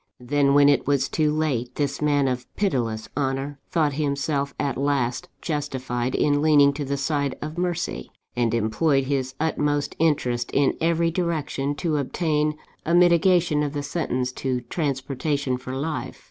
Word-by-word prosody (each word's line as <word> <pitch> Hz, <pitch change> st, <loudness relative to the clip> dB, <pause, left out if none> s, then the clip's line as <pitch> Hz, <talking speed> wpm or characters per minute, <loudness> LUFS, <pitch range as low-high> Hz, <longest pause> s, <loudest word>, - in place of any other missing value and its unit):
"Then, 140 Hz, +2 st, +2 dB
when 145 Hz, 0 st, +7 dB
it 145 Hz, -2 st, +3 dB
was 140 Hz, -2 st, +2 dB
too 155 Hz, -2 st, +1 dB
late, 135 Hz, -6 st, -1 dB
this 140 Hz, -1 st, -2 dB
man 145 Hz, -2 st, +2 dB
of 125 Hz, -1 st, -2 dB
pitiless 115 Hz, -, -1 dB
honour 135 Hz, +1 st, -2 dB
thought 155 Hz, -4 st, +1 dB
himself 140 Hz, 0 st, -1 dB
at 140 Hz, -2 st, -1 dB
last 140 Hz, +3 st, -1 dB
justified 130 Hz, -5 st, -2 dB
in 145 Hz, -1 st, +2 dB
leaning 145 Hz, -2 st, +5 dB
to 145 Hz, +1 st, -4 dB
the 140 Hz, 0 st, -2 dB
side 140 Hz, -1 st, -1 dB
of 155 Hz, +1 st, -6 dB
mercy, 175 Hz, -1 st, -2 dB, 0.3 s
and 120 Hz, -2 st, +1 dB
employed 135 Hz, +6 st, +2 dB
his 130 Hz, -1 st, -2 dB
utmost 150 Hz, -2 st, 0 dB
interest, 125 Hz, -7 st, +1 dB
in 140 Hz, 0 st, +3 dB
every 165 Hz, 0 st, +2 dB
direction, 155 Hz, -5 st, -1 dB
to 155 Hz, -1 st, -1 dB
obtain 150 Hz, +1 st, 0 dB, 0.3 s
a 170 Hz, -, +1 dB
mitigation 175 Hz, -2 st, +4 dB
of 145 Hz, -1 st, -2 dB
the 145 Hz, -1 st, -3 dB
sentence 130 Hz, -6 st, -2 dB
to 125 Hz, -1 st, -2 dB
transportation 140 Hz, -1 st, -2 dB
for 130 Hz, +1 st, -6 dB
life. 150 Hz, +3 st, -4 dB
145 Hz, 155 wpm, -24 LUFS, 130-155 Hz, 0.3 s, when